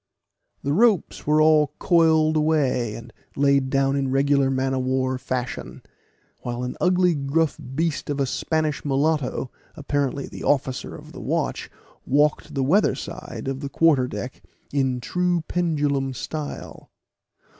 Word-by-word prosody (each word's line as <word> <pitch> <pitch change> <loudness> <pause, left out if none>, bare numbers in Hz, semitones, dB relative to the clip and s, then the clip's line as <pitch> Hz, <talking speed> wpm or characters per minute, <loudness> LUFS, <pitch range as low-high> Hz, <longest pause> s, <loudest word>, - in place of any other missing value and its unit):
The 140 - 0
ropes 210 -4 +2
were 150 +1 +4
all 155 -2 +4
coiled 160 -3 +3
away, 140 -8 +1
and 115 - -10 0.2
laid 140 -1 +3
down 135 0 +2
in 135 -1 0
regular 140 0 +2
man 135 0 0
of 130 - 0
war 130 0 0
fashion; 125 -1 -4 0.6
while 120 0 -4
an 125 - -4
ugly 180 -1 +3
gruff 150 +2 0 0.2
beast 160 -1 -1
of 145 -1 -2
a 140 - +2
Spanish 155 +3 -1
mulatto, 140 -2 0 0.2
apparently 140 -2 -1
the - - -9
officer 130 -2 0
of - - -12
the - - -9
watch, - - -2 0.3
walked 150 +2 +1
the 135 - +1
weatherside 170 -2 -1
of 135 0 -2
the 140 -1 -5
quarterdeck 130 -7 +1 0.3
in 135 -3 +1
the 125 - -6
true 180 +5 0
pendulum 145 -6 0
style. 150 +4 -6
140 Hz, 140 wpm, -23 LUFS, 130-155 Hz, 0.6 s, were